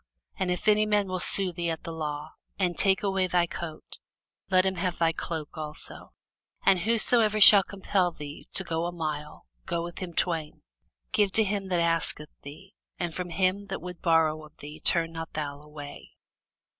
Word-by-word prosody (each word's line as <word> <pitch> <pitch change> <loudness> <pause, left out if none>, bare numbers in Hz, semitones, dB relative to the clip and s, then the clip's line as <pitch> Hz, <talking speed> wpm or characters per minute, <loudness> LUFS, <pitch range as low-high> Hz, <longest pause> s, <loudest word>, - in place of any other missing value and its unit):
And 190 -1 0
if 180 +4 -2
any 215 0 +4
man 205 -2 +2
will 185 0 -3
sue 190 +1 0
thee 170 0 -2
at 160 -1 -4
the 165 - -5
law, 150 -2 -5 0.3
and 180 -3 0
take 195 0 +2
away 195 -2 +1
thy 175 -1 +2
coat, 165 -2 -8 0.5
let 185 -1 +4
him 190 - +1
have 180 0 -1
thy 165 -1 +3
cloke 160 -1 -5
also. 155 0 -6 0.5
And 190 - +5
whosoever 220 +1 +3
shall 205 0 +11
compel 190 -2 0
thee 150 -2 -9
to 190 - 0
go 165 -1 -2
a - - -3
mile, 155 -3 -5 0.2
go 170 -2 -1
with 175 0 -7
him 175 -3 -6
twain. 165 -4 -2 0.5
Give 205 -2 +2
to 220 - +4
him 200 -1 -2
that 180 -2 +1
asketh 165 -2 -1
thee, 170 +8 -12 0.2
and 175 -2 -3
from 180 0 -4
him 190 +3 0
that 195 - -4
would 180 -1 -8
borrow 160 -3 +2
of 155 0 -16
thee 150 +2 -10
turn 165 +1 +3
not 165 0 -7
thou 145 -2 -4
away. 150 -1 -10
175 Hz, 185 wpm, -27 LUFS, 160-190 Hz, 0.5 s, shall